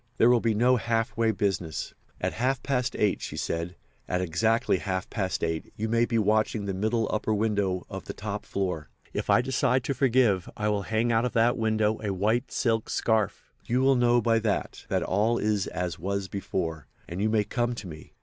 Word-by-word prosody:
There 120 - +6
will 120 - +5
be 115 -1 +1
no 125 +3 +4
half 115 -1 -1
way 115 0 +2
business. 95 -7 -2 0.3
At - - -1
half 125 +2 0
past 125 -3 0
eight,' 105 -2 +1
she - - -5
said, 85 +1 -3 0.3
'at 90 - +1
exactly 95 +5 +1
half 95 -1 -2
past 95 -4 -2
eight 80 -1 -2
you 110 - -2
may 115 +1 +3
be 120 -1 0
watching 110 0 +1
the 100 - -2
middle 110 +4 0
upper 110 0 -1
window 100 -4 0
of - - -7
the - - -5
top - - -5
floor. 90 -8 -3 0.2
If - - -3
I - - +5
decide 130 0 +1
to 140 - -1
forgive 120 -8 +2
I 105 0 0
will 105 -1 +1
hang 115 +2 +1
out 115 0 +3
of 125 - -2
that 115 +1 +3
window 110 -2 +1
a 105 - -1
white 110 +7 0
silk 115 -2 0
scarf. 110 -3 0
You 125 +2 +1
will 135 +1 +5
know 120 -1 +4
by 115 -1 +3
that 110 -3 -2
that - - +1
all 110 +5 +1
is 105 -2 0
as 90 -3 -3
was 100 +2 -2
before, 85 -5 -3 0.2
and 90 +3 -4
you 110 - +2
may 110 -1 +2
come 120 +3 -1
to 110 - -7
me. 80 -2 -11
110 Hz, 205 wpm, -27 LUFS, 95-115 Hz, 0.3 s, There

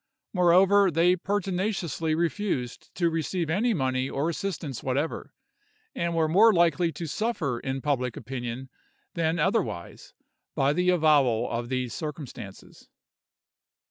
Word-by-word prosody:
Moreover, 190 +2 +5
they 175 +2 +3
pertinaciously 185 - -1
refused 170 - -2
to 170 -2 +1
receive 165 +1 -2
any 220 +8 +2
money 130 - 0
or 145 +4 -1
assistance 170 - -4
whatever, 140 +5 -3 0.6
and 170 0 -2
were 160 -1 +2
more 205 +8 +6
likely 170 -2 +2
to 170 - -5
suffer 155 - -2
in 135 +1 -4
public 125 -5 -1
opinion 130 0 -6 0.4
than 165 0 0
otherwise 180 - -2 0.4
by 135 +1 +2
the 180 +3 +1
avowal 145 -9 +3
of 120 0 -3
these 130 -2 -2
circumstances. 145 - -8
160 Hz, 120 wpm, -27 LUFS, 135-180 Hz, 0.6 s, more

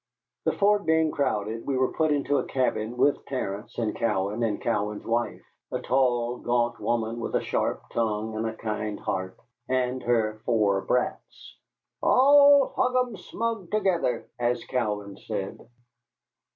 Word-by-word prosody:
The 160 - +2
fort 205 -2 +2
being 160 -1 +3
crowded, 110 -5 -2
we 135 -2 0
were 130 0 +1
put 155 -1 +1
into 145 0 +1
a - - -2
cabin 125 -3 -1
with 145 +3 +2
Terence 105 -6 -4
and 110 -2 -1
Cowan 105 -1 -1
and 110 -3 0
Cowan's 105 -2 -2
wife 120 +1 -1 0.3
a - - -1
tall, 125 -2 +1
gaunt 120 -1 0
woman 115 0 -1
with 115 - -3
a - - +4
sharp - - -1
tongue 110 -1 -1
and 110 +1 -1
a 110 - -4
kind 105 -1 -3
heart 95 0 -3 0.3
and 130 0 0
her 110 -3 0
four 105 -4 +2
brats, 125 +4 -3 0.5
"All 285 +1 +6
hugemsmug 230 -5 -1
together," 180 - 0
as 120 0 0
Cowan 105 -5 -2
said. 100 -3 -5
120 Hz, 140 wpm, -26 LUFS, 110-145 Hz, 0.5 s, All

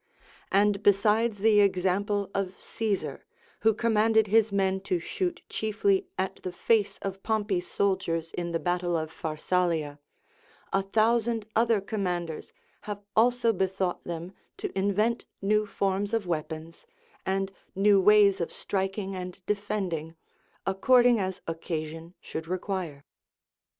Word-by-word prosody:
And 200 +1 +3
besides 210 +2 +3
the 210 +1 +4
example 200 +1 +1
of 190 -1 -3
Caesar, 215 -4 -3 0.4
who 225 - +4
commanded 220 -1 +3
his 220 +1 +3
men 190 -1 +1
to 190 -2 -1
shoot 350 - -3
chiefly 375 - 0
at 190 - -2
the 185 - -4
face 210 +3 +1
of 195 0 -4
Pompey's 205 -5 -1
soldiers 170 -5 0
in 170 -1 -3
the 165 - +1
battle 175 0 0
of 160 0 -3
Pharsalia, 160 -2 -1 0.7
a 195 - +3
thousand 225 +2 +1
other 225 -1 +3
commanders 180 -5 -3 0.3
have 205 -1 -5
also 235 0 +4
bethought 190 -1 -1
them 170 +2 -6 0.2
to - - -5
invent 205 +4 +1
new 210 +1 +2
forms 200 +2 0
of 225 -4 -1
weapons 160 - -5 0.4
and 195 0 -1 0.2
new 200 0 +5
ways 200 -1 +5
of 170 - -2
striking 195 0 -3
and 180 0 -7
defending, 190 -6 -2 0.5
according 240 +5 +4
as 190 -1 -3
occasion 165 0 -5
should 160 -1 -6
require. 180 -5 -4
195 Hz, 125 wpm, -28 LUFS, 180-210 Hz, 0.7 s, new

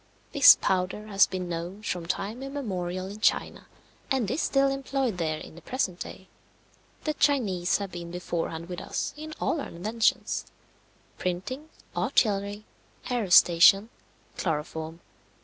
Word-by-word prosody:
This 285 -3 +9
powder 185 +3 -1
has 200 0 +5
been 185 -1 -4
known 175 +4 -5
from 175 -5 -3
time 205 +6 -3
immemorial 190 -10 -4
in 200 +2 -8
China, - - 0 0.4
and 250 -7 0
is 285 - 0
still 275 0 +2
employed 270 -6 -2
there 155 -2 -1
in - - -10
the 170 - -13
present 185 - -2
day. 190 - -8 0.8
The 305 - 0
Chinese 210 -13 +2
have 200 -2 -5
been 170 -1 -7
beforehand 170 -1 -4
with 180 -1 -6
us - - -3
in 310 +1 -8
all 315 - 0
our - - -5
inventions 215 +6 0 0.7
printing, 255 - -3 0.3
artillery, 205 -1 +1 0.5
aerostation, 195 -2 +6 0.5
chloroform. 160 0 -3
195 Hz, 130 wpm, -27 LUFS, 175-250 Hz, 0.8 s, This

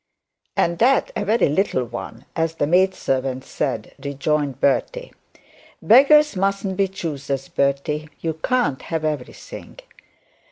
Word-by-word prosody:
'And 170 0 +1
that 260 +4 +3
a - - -1
very 220 +3 +2
little 150 -3 +1
one, 120 0 -8
as 165 0 -1
the 145 - 0
maid 185 +4 +3
servant 130 -3 -2
said,' - - -3
rejoined 140 -1 -1
Bertie. - - 0 0.7
'Beggars 285 +4 +6
mustn't 195 0 -1
be 195 0 +2
choosers, 140 -7 -4
Bertie; 140 +2 -1
you 165 -1 -2
can't 235 - 0
have 160 -2 -3
everything.' 150 -5 -6
160 Hz, 125 wpm, -22 LUFS, 140-195 Hz, 0.7 s, Beggars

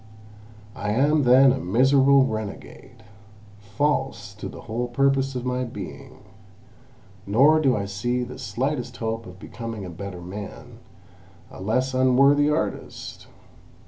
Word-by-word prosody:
I 105 0 -2
am 145 +4 +2
then 130 +2 +7
a 135 - -3
miserable 135 +6 +4
renegade, 110 +1 -7 0.6
false 135 0 -2
to 105 - -7
the - - -10
whole 120 +2 -3
purpose 135 +2 +1
of 125 0 -4
my 125 0 -1
being—nor 105 -3 -9 1.3
do 135 -6 +2
I 100 - -2
see 120 +6 -2
the 125 +1 -8
slightest 125 +3 -3
hope 115 0 -4
of 90 0 -12
becoming 115 0 -7
a 90 - -7
better 90 +1 -7
man, 100 +3 -9 0.7
a - - -11
less 125 +6 0
unworthy 135 +3 +4
artist! 150 +2 -4
125 Hz, 125 wpm, -24 LUFS, 105-135 Hz, 1.3 s, then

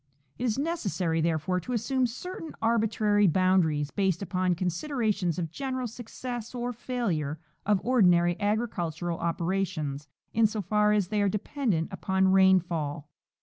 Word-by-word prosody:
It 250 - -1
is 225 -1 0
necessary, 195 - -1
therefore, 165 +2 0
to 250 +8 -5
assume 250 +3 +1
certain 325 +7 -7
arbitrary 215 -2 +2
boundaries 165 -5 +2
based 190 -2 0
upon 185 -1 0
considerations 185 - -1
of 165 -3 -3
general 260 +2 -3
success 240 +1 -6
or 245 0 -2
failure 205 - -2 0.3
of 210 -2 +4
ordi 245 -4 +4
nary 175 0 +4
agricultural 175 -6 -1
operations 165 -4 -2 0.3
in 225 0 +4
so 215 +1 -4
far 210 +2 +2
as 205 -4 +1
they 210 -1 +1
are 200 - +3
dependent 210 - -1
upon 190 0 +1
rainfall. 175 -6 +2
195 Hz, 140 wpm, -28 LUFS, 170-230 Hz, 0.3 s, of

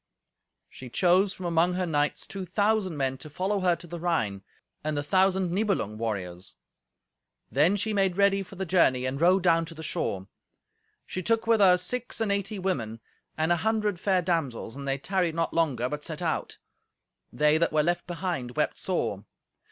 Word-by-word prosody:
She 130 - -11
chose 185 - +3
from 185 - -8
among 170 +1 +2
her 180 0 -1
knights 145 -3 0
two 195 -1 -6
thousand 200 -1 0
men 135 -1 -1
to 155 - -9
follow 190 +6 -1
her 180 -2 +3
to 170 - -10
the 175 0 -7
Rhine, 110 - -1 0.4
and 155 -1 -2
the 145 - -1
thousand 190 +2 +2
Nibelung 185 - -1
warriors. 95 -5 -4 1.0
Then 155 +8 +4
she 215 +2 -1
made 195 -3 +1
ready 200 0 +4
for 195 0 -10
the 190 +1 -3
journey, 160 -8 +3
and 135 +3 -3
rode 180 +2 +4
down 165 -2 +4
to 165 - -11
the 160 - -8
shore. 95 -10 -2 0.8
She 185 - -4
took 225 +3 +1
with 225 -1 +3
her 185 -3 +6
six 245 +8 -3
and 220 -3 0
eighty 200 +1 -1
women, 125 - -2 0.4
and 160 +2 +1
an 170 - +3
hundred 215 -3 0
fair 190 -2 +1
damsels, 150 -10 -2
and 140 0 -7
they 135 0 +1
tarried 175 +2 -1
not 165 0 -1
longer, 140 -8 +1
but 150 +2 -5
set 160 +2 -5
out. 160 -2 -2 0.7
They 150 +5 +3
that 170 - +2
were 155 -1 +3
left 175 +2 -1
behind 170 -9 -4
wept - - 0
sore! - - -2
175 Hz, 185 wpm, -27 LUFS, 145-190 Hz, 1.0 s, her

